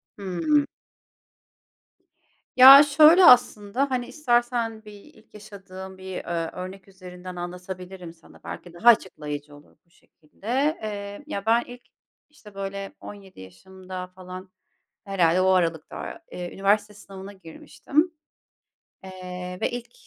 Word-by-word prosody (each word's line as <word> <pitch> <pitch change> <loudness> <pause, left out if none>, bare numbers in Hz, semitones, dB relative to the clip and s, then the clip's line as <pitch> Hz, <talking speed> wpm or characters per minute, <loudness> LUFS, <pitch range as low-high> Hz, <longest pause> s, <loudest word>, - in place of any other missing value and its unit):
Hıı. 205 - 0 1.9
Ya, 270 +3 +11
şöyle 310 +5 +6
aslında, 245 +1 +4
hani, 245 -1 -2
istersen 240 -5 -1
bir 210 - -11
ilk 220 +2 -19
yaşadığım 190 -2 -11
bir, 190 -1 -7
ııı, 165 -1 -3
örnek 185 +2 -9
üzerinden 185 -1 -11
anlatabilirim 180 0 -8
sana, 165 0 -20
belki 175 - -9
daha 200 +8 +4
açıklayıcı 150 -9 -1
olur 145 - -20
bu - - -37
şekilde, 230 - -4
eee, 205 +2 -6
ya 200 -9 -5
ben 230 +2 +3
ilk 245 0 -12 0.5
işte 215 -9 -17
böyle 195 0 -6
17 195 - -12
yaşımda 185 - -10
falan 185 0 -11 0.5
herhâlde 185 -4 +1
o 190 - +3
aralıkta, 175 - -2
eee, 175 -1 -7
üniversite 205 +2 +1
sınavına 195 -1 -11
girmiştim. 275 - -3 0.9
Eee, 180 -1 -8
ve - - 0
ilk 245 0 -7
195 Hz, 120 wpm, -24 LUFS, 180-230 Hz, 1.9 s, Ya